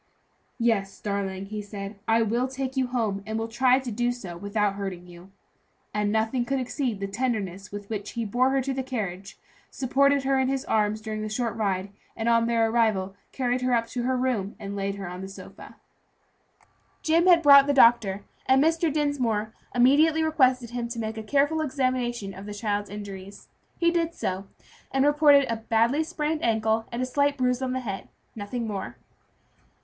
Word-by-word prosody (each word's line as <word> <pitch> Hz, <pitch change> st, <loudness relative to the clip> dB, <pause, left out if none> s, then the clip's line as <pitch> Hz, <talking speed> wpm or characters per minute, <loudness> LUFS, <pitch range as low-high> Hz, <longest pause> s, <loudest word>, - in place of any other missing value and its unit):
"Yes, 225 Hz, -5 st, 0 dB
darling," 195 Hz, -2 st, -3 dB
he 210 Hz, +1 st, -5 dB
said, 200 Hz, 0 st, -8 dB
"I 225 Hz, +1 st, +4 dB
will 235 Hz, +4 st, 0 dB
take 265 Hz, 0 st, -4 dB
you 260 Hz, -1 st, +1 dB
home 225 Hz, -5 st, -1 dB
and 220 Hz, 0 st, -2 dB
will 225 Hz, 0 st, -2 dB
try 250 Hz, +2 st, +3 dB
to 260 Hz, -3 st, -4 dB
do 240 Hz, +3 st, 0 dB
so 195 Hz, -8 st, -7 dB
without 200 Hz, +2 st, -1 dB
hurting 195 Hz, -3 st, -5 dB
you;" 175 Hz, +1 st, -14 dB, 0.6 s
and 210 Hz, -1 st, 0 dB
nothing 220 Hz, +3 st, +1 dB
could 270 Hz, +3 st, -1 dB
exceed 250 Hz, -3 st, -2 dB
the 195 Hz, -, -2 dB
tenderness 200 Hz, -3 st, -3 dB
with 205 Hz, 0 st, -7 dB
which 210 Hz, -1 st, -5 dB
he 230 Hz, -1 st, -2 dB
bore 245 Hz, +5 st, +2 dB
her 270 Hz, 0 st, +1 dB
to 270 Hz, +1 st, -2 dB
the 265 Hz, -, -2 dB
carriage, 200 Hz, -7 st, -5 dB, 0.3 s
supported 275 Hz, +1 st, +2 dB
her 270 Hz, 0 st, +2 dB
in 260 Hz, -, +2 dB
his 270 Hz, 0 st, -1 dB
arms 215 Hz, 0 st, +1 dB
during 215 Hz, -1 st, -4 dB
the 215 Hz, -, -3 dB
short 230 Hz, +1 st, -2 dB
ride, 195 Hz, -3 st, -1 dB, 0.2 s
and 225 Hz, -, -3 dB
on 230 Hz, 0 st, +3 dB
their 230 Hz, -1 st, +2 dB
arrival 215 Hz, -4 st, +1 dB, 0.2 s
carried 250 Hz, -1 st, -1 dB
her 250 Hz, -1 st, +2 dB
up 230 Hz, -1 st, +1 dB
to 245 Hz, -, -3 dB
her 255 Hz, +1 st, 0 dB
room 240 Hz, -6 st, -1 dB
and 200 Hz, 0 st, -6 dB
laid 200 Hz, 0 st, -2 dB
her 200 Hz, -, -7 dB
down 180 Hz, +1 st, -6 dB
upon 190 Hz, -, -6 dB
a -, -, -7 dB
sofa. 195 Hz, -, -12 dB, 1.3 s
Jim 330 Hz, +3 st, +3 dB
had 340 Hz, -2 st, +6 dB
brought 280 Hz, -1 st, +8 dB
the -, -, +3 dB
doctor, 230 Hz, -7 st, +4 dB, 0.2 s
and 265 Hz, +1 st, +5 dB
Mr. 325 Hz, 0 st, +2 dB
Dinsmore 250 Hz, -8 st, -1 dB, 0.2 s
immediately 300 Hz, +6 st, +4 dB
requested 255 Hz, -6 st, +2 dB
him 240 Hz, -1 st, -3 dB
to 235 Hz, 0 st, -6 dB
make 220 Hz, 0 st, -4 dB
a -, -, -4 dB
careful 285 Hz, +7 st, +1 dB
examination 255 Hz, -7 st, -1 dB
of 195 Hz, +2 st, -10 dB
the 210 Hz, -, -6 dB
child's 205 Hz, -1 st, -2 dB
injuries. 200 Hz, -1 st, -9 dB, 0.3 s
He 340 Hz, -1 st, +3 dB
did 335 Hz, -1 st, -1 dB
so, 190 Hz, +1 st, -3 dB, 0.4 s
and 270 Hz, +1 st, +2 dB
reported 290 Hz, -1 st, +5 dB
a 230 Hz, -2 st, -1 dB
badly 230 Hz, +6 st, +1 dB
sprained 310 Hz, 0 st, -2 dB
ankle, 220 Hz, 0 st, +1 dB
and 240 Hz, +2 st, -2 dB
a -, -, +1 dB
slight 285 Hz, +2 st, +1 dB
bruise 250 Hz, 0 st, +1 dB
on 255 Hz, -1 st, -1 dB
the 260 Hz, -, -2 dB
head; 200 Hz, -5 st, -6 dB, 0.3 s
nothing 225 Hz, +3 st, -4 dB
more. 195 Hz, -, -5 dB
230 Hz, 195 wpm, -26 LUFS, 205-265 Hz, 1.3 s, brought